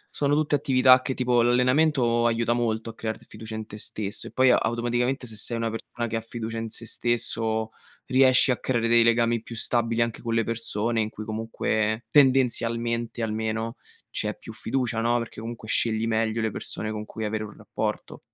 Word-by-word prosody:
sono 145 Hz, 0 st, +1 dB
tutte 150 Hz, -1 st, +1 dB
attività 130 Hz, -2 st, +5 dB
che 130 Hz, -, -2 dB
tipo 125 Hz, -1 st, +2 dB
l'allenamento 125 Hz, 0 st, +3 dB
aiuta 115 Hz, 0 st, +2 dB
molto 115 Hz, -1 st, -1 dB
a -, -, -21 dB
crearti 110 Hz, -1 st, -5 dB
fiducia 110 Hz, 0 st, -7 dB
in 110 Hz, 0 st, -5 dB
te 105 Hz, -, -9 dB
stesso 105 Hz, -1 st, -3 dB
e -, -, -10 dB
poi 130 Hz, 0 st, +4 dB
automaticamente 120 Hz, +3 st, 0 dB
se 110 Hz, -, -8 dB
sei 115 Hz, +3 st, 0 dB
una 115 Hz, 0 st, -1 dB
persona 115 Hz, +1 st, -5 dB
che 115 Hz, -, -4 dB
ha 115 Hz, -, -1 dB
fiducia 115 Hz, 0 st, -5 dB
in 115 Hz, 0 st, -4 dB
sé 115 Hz, -, -1 dB
stesso, 115 Hz, -2 st, 0 dB, 0.4 s
riesci 130 Hz, 0 st, +5 dB
a 125 Hz, -, 0 dB
creare 120 Hz, -3 st, 0 dB
dei 115 Hz, 0 st, +5 dB
legami 115 Hz, 0 st, +2 dB
più 115 Hz, -, -9 dB
stabili 115 Hz, 0 st, +1 dB
anche 115 Hz, -1 st, -1 dB
con 115 Hz, -1 st, -3 dB
le 115 Hz, -1 st, +1 dB
persone 115 Hz, 0 st, -1 dB
in 110 Hz, -, -2 dB
cui 110 Hz, 0 st, -8 dB
comunque 110 Hz, 0 st, -2 dB
tendenzialmente 120 Hz, -3 st, +2 dB
almeno 110 Hz, +1 st, -2 dB, 0.3 s
c'è -, -, -3 dB
più -, -, -10 dB
fiducia, 120 Hz, -2 st, -1 dB
no, 120 Hz, +1 st, +2 dB
perché 115 Hz, -1 st, -7 dB
comunque 115 Hz, -1 st, -7 dB
scegli 110 Hz, 0 st, 0 dB
meglio 110 Hz, 0 st, 0 dB
le 110 Hz, -1 st, -1 dB
persone 110 Hz, +2 st, -4 dB
con 105 Hz, 0 st, -4 dB
cui 110 Hz, +1 st, -6 dB
avere 110 Hz, 0 st, -2 dB
un 105 Hz, -, -8 dB
rapporto. -, -, -4 dB
115 Hz, 190 wpm, -25 LUFS, 110-120 Hz, 0.4 s, attività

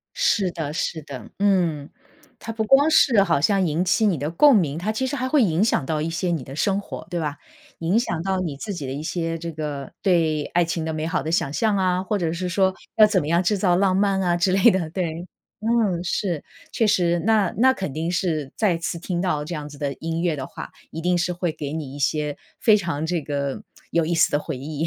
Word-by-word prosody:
是 210 Hz, -, +2 dB
的 160 Hz, -4 st, -4 dB
是 160 Hz, -1 st, -2 dB
的， 140 Hz, -3 st, -9 dB
嗯。 175 Hz, -8 st, +1 dB, 0.5 s
它 225 Hz, -, -6 dB
不 220 Hz, 0 st, -1 dB
光 275 Hz, +6 st, +5 dB
是 240 Hz, -9 st, +5 dB
好 170 Hz, -6 st, +2 dB
像 190 Hz, +4 st, +2 dB
引 165 Hz, +4 st, 0 dB
起 215 Hz, +4 st, +2 dB
你 185 Hz, -5 st, +2 dB
的 145 Hz, +3 st, -3 dB
共 260 Hz, -, +6 dB
鸣， 160 Hz, -5 st, 0 dB
它 200 Hz, +5 st, -2 dB
其 260 Hz, +4 st, -1 dB
实 275 Hz, -, -3 dB
还 260 Hz, -1 st, -2 dB
会 285 Hz, -2 st, +4 dB
影 170 Hz, -1 st, +1 dB
响 200 Hz, -9 st, +2 dB
到 155 Hz, +1 st, -1 dB
一 155 Hz, -, -1 dB
些 170 Hz, +2 st, -2 dB
你 165 Hz, -6 st, -1 dB
的 135 Hz, +3 st, -9 dB
生 195 Hz, +3 st, +1 dB
活， 160 Hz, -5 st, -8 dB
对 175 Hz, -1 st, -2 dB
吧？ 150 Hz, -2 st, -3 dB, 0.4 s
影 175 Hz, +7 st, +2 dB
响 170 Hz, -9 st, -2 dB
到 190 Hz, 0 st, -1 dB
你 160 Hz, -6 st, -3 dB
自 205 Hz, +8 st, -5 dB
己 155 Hz, -7 st, -5 dB
的 130 Hz, -, -4 dB
一 145 Hz, -, -5 dB
些 165 Hz, 0 st, -2 dB
这 165 Hz, 0 st, -6 dB
个， 150 Hz, -3 st, -5 dB
对 160 Hz, -5 st, +2 dB
爱 175 Hz, 0 st, +4 dB
情 165 Hz, 0 st, -3 dB
的 160 Hz, 0 st, -3 dB
美 155 Hz, 0 st, -2 dB
好 165 Hz, -, -1 dB
的 155 Hz, -, -3 dB
想 145 Hz, -4 st, 0 dB
象 215 Hz, +3 st, +1 dB
啊， 185 Hz, -1 st, +1 dB
或 205 Hz, +2 st, -1 dB
者 170 Hz, -4 st, -1 dB
是 180 Hz, +2 st, -3 dB
说， 190 Hz, +1 st, +2 dB, 0.2 s
要 215 Hz, -1 st, +8 dB
怎 200 Hz, -3 st, +2 dB
么 145 Hz, -, -4 dB
样 170 Hz, +3 st, +2 dB
制 205 Hz, +3 st, +1 dB
造 180 Hz, -2 st, +3 dB
浪 190 Hz, 0 st, +2 dB
漫 195 Hz, 0 st, +2 dB
啊 175 Hz, -1 st, +2 dB
之 185 Hz, +2 st, +2 dB
类 190 Hz, 0 st, +6 dB
的， 180 Hz, -4 st, -1 dB
对。 170 Hz, 0 st, -4 dB, 0.4 s
嗯， 215 Hz, -6 st, +1 dB
是， 175 Hz, -2 st, -2 dB, 0.3 s
确 225 Hz, -, +2 dB
实， 175 Hz, -4 st, +2 dB
那 215 Hz, -4 st, +3 dB
那 260 Hz, +3 st, +6 dB
肯 190 Hz, -, -4 dB
定 160 Hz, +4 st, -2 dB
是 165 Hz, -6 st, -1 dB
再 190 Hz, -6 st, +1 dB
次 170 Hz, 0 st, -3 dB
听 175 Hz, 0 st, -3 dB
到 155 Hz, -6 st, -1 dB
这 170 Hz, -, -5 dB
样 150 Hz, -2 st, -5 dB
子 145 Hz, -, -12 dB
的 140 Hz, -1 st, -2 dB
音 165 Hz, +1 st, -2 dB
乐 175 Hz, -3 st, +1 dB
的 130 Hz, -2 st, -5 dB
话， -, -, -9 dB, 0.2 s
一 160 Hz, -, -6 dB
定 180 Hz, 0 st, +2 dB
是 175 Hz, 0 st, -1 dB
会 175 Hz, -2 st, -2 dB
给 145 Hz, -1 st, -5 dB
你 145 Hz, -4 st, -5 dB
一 145 Hz, -, -8 dB
些 150 Hz, +1 st, -1 dB, 0.2 s
非 220 Hz, -, +5 dB
常 165 Hz, -5 st, -3 dB
这 170 Hz, 0 st, -1 dB
个， 140 Hz, -2 st, -3 dB, 0.3 s
有 165 Hz, -1 st, +1 dB
意 170 Hz, -, 0 dB
思 165 Hz, -, +4 dB
的 145 Hz, -, +1 dB
回 155 Hz, -2 st, -5 dB
忆。 150 Hz, +4 st, -3 dB
170 Hz, 265 characters per minute, -23 LUFS, 155-195 Hz, 0.5 s, 要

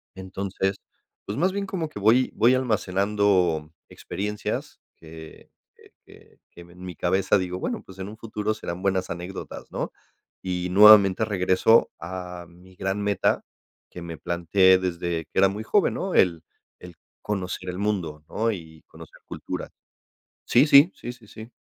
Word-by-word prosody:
Entonces, 95 Hz, +1 st, -3 dB, 0.5 s
pues, 100 Hz, -, -5 dB
más 185 Hz, +2 st, +2 dB
bien 200 Hz, 0 st, -3 dB
como 175 Hz, -5 st, -4 dB
que 105 Hz, -, -8 dB
voy 115 Hz, +5 st, +3 dB
voy 120 Hz, +4 st, +4 dB
almacenando 100 Hz, -8 st, +1 dB, 0.2 s
experiencias, 105 Hz, +1 st, -5 dB, 0.2 s
que 80 Hz, -1 st, -13 dB, 0.2 s
que -, -, -21 dB
que -, -, -19 dB
que 85 Hz, -, -13 dB
ven 85 Hz, +1 st, -17 dB
mi 90 Hz, -3 st, -7 dB
cabeza, 95 Hz, +4 st, +1 dB
digo, 90 Hz, 0 st, -3 dB
bueno, -, -, -4 dB
pues, 95 Hz, 0 st, -14 dB
en 95 Hz, -, -5 dB
un 110 Hz, +2 st, -10 dB
futuro 110 Hz, -1 st, -3 dB
serán 90 Hz, -4 st, -6 dB
buenas 95 Hz, -1 st, 0 dB
anécdotas, 90 Hz, +2 st, -7 dB
¿no? -, -, -4 dB, 0.5 s
Y 90 Hz, -1 st, -3 dB
nuevamente 105 Hz, +1 st, +7 dB
regreso 95 Hz, +2 st, +3 dB
a 90 Hz, 0 st, -7 dB
mi 90 Hz, +2 st, -19 dB
gran 95 Hz, +2 st, -2 dB
meta 100 Hz, -1 st, 0 dB, 0.5 s
que 90 Hz, -, -10 dB
me 85 Hz, -1 st, -7 dB
planteé 95 Hz, +2 st, +3 dB
desde 85 Hz, -2 st, -3 dB
que -, -, -53 dB
era 95 Hz, 0 st, +5 dB
muy 105 Hz, +2 st, -5 dB
joven, 200 Hz, -, +2 dB
¿no? 190 Hz, -1 st, -3 dB
El 85 Hz, -3 st, +3 dB, 0.4 s
el 90 Hz, -1 st, -12 dB, 0.3 s
conocer 95 Hz, -2 st, -4 dB
el 90 Hz, -, -5 dB
mundo, 90 Hz, -7 st, -2 dB
¿no? 115 Hz, +1 st, 0 dB
Y 80 Hz, -5 st, -9 dB
conocer -, -, -15 dB
cultura -, -, -6 dB, 0.8 s
sí, 130 Hz, +5 st, +4 dB
sí. 145 Hz, +5 st, +7 dB
Sí, 120 Hz, -, -7 dB
sí, 115 Hz, -3 st, -19 dB
sí. 110 Hz, +3 st, -11 dB
95 Hz, 160 wpm, -24 LUFS, 90-105 Hz, 0.8 s, nuevamente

